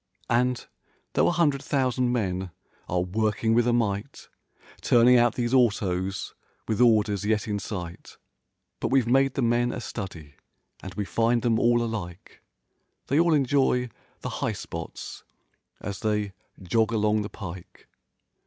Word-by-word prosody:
And, 125 +1 +1 0.5
though - - +3
a - - +3
hundred 155 -6 +2
thousand 130 -3 0
men 95 -6 -1 0.4
are 90 0 +1
working 110 +3 0
with 120 +1 +3
a - - +4
might 115 +2 -2 0.5
Turning 120 +1 +5
out 120 -1 +4
these 120 0 -1
autos, 100 -6 +1 0.3
with 110 +2 0
orders 105 -4 +3
yet 105 +1 0
in 105 -1 -1
sight. 90 -4 -7 0.6
But - - -1
we've 135 -3 +3
made 135 +2 +3
the 135 - 0
men 120 +1 +2
a - - -5
study 90 -11 -7 0.4
and 95 - -8
we 105 - -2
find 115 +2 +1
them 115 -2 +2
all 120 0 +3
alike. 100 -6 -6 0.7
They 140 - +3
all 170 -1 +4
enjoy 130 -3 +2 0.3
the - - -4
"high - - 0
spots" 85 0 -7 0.6
as 100 -2 -5
they 105 -2 -1 0.3
"jog 110 +4 +1
along 105 -1 +2
the 105 - -5
pike." 90 -4 -10
115 Hz, 145 wpm, -26 LUFS, 100-125 Hz, 0.7 s, Turning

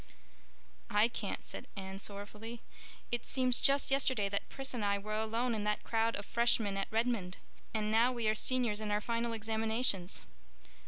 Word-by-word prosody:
"I 210 +3 +4
can't," - - -4
said - - -7
Anne, 190 0 -6
sorrowfully. 210 +4 -7 0.5
"It 240 -1 -2
seems 255 -2 +2
just 275 0 +4
yesterday 260 -7 +2
that 200 0 -2
Pris 270 -1 -3
and 235 -4 -2
I 200 0 +2
were 210 +2 -5
alone 225 +3 0
in 215 -2 -2
that 210 0 0
crowd 225 0 +1
of 205 - -5
Freshmen 235 -4 +2
at 195 0 -1
Redmond. 220 -5 0 0.3
And 215 -1 -1
now 230 +3 +4
we 235 -3 -1
are 215 - +4
Seniors 230 -2 +2
in 215 - -3
our 210 0 +2
final 235 +2 -1
examinations." 220 -3 0
220 Hz, 170 wpm, -34 LUFS, 205-235 Hz, 0.5 s, I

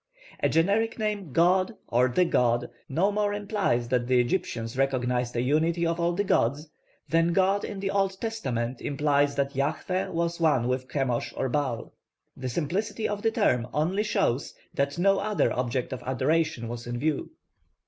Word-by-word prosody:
A - - +3
generic 205 +7 +2
name 210 - -2
'god' 185 - +3
or 125 +2 +3
'the 180 +9 +2
god' 120 -7 +1 0.2
no 180 +9 +2
more 205 0 0
implies 200 - 0
that 125 -2 +1
the 125 -1 +4
Egyptians 120 -4 -1
recognised 125 -2 0
a 120 - +1
unity 160 +5 +1
of 165 +1 0
all 170 +1 +1
the 200 +4 0
gods, 145 - +1 0.4
than 165 +1 +2
'god' 195 +2 +2
in 200 - -5
the 195 0 -1
Old 195 -1 0
Testament 130 - -3
implies 145 0 +1
that 140 0 0
Yahvah 155 +7 -1
was 170 0 -1
one 145 -8 +3
with 130 0 -2
Chemosh 130 -4 -1
and 130 - -1
Baal. 130 -5 -2 0.4
The 130 0 -4
simplicity 185 - -2
of 205 0 -3
the 225 - +3
term 125 - +1
only 175 +7 +1
shows 140 - 0 0.2
that 140 +2 -1
no 195 +2 +3
other 210 +1 +1
object 125 +1 -2
of 130 - -6
adoration 130 -1 0
was 120 0 -6
in 120 0 -3
view. 150 +2 -1
150 Hz, 170 wpm, -27 LUFS, 125-190 Hz, 0.4 s, the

